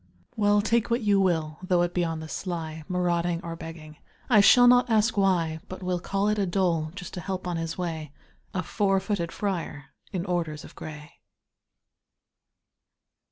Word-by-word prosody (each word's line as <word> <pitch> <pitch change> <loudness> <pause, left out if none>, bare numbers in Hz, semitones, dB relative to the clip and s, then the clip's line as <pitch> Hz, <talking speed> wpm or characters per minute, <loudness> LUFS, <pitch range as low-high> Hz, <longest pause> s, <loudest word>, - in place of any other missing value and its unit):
Well, 205 -2 +3
take 230 +1 +1
what 235 +2 +1
you 205 -2 +3
will, 160 -5 0
though 180 -1 +2
it 175 0 -2
be 175 - +1
on 165 -1 -2
the 160 - -7
sly, 160 -2 -5
Marauding 175 -1 0
or 165 0 -5
begging, 160 -2 -10 0.3
I 215 -3 +8
shall 245 +4 +7
not 245 0 +5
ask 220 0 +3
why, 175 -5 +2
But 185 0 -7
will 180 -1 -1
call 195 +3 -1
it 210 0 +1
a 195 - +1
dole, 170 -4 0
just 180 -2 -8
to 180 - -5
help 185 +2 -4
on 175 -1 -2
his 165 0 -4
way 160 -5 -4 0.4
A 185 - -2
four 195 +1 +1
footed 190 -4 -2
friar 165 -8 -4 0.2
in 185 -3 -3
orders 165 -5 -2
of - - -12
gray! 150 +1 -10
180 Hz, 175 wpm, -26 LUFS, 165-200 Hz, 0.4 s, I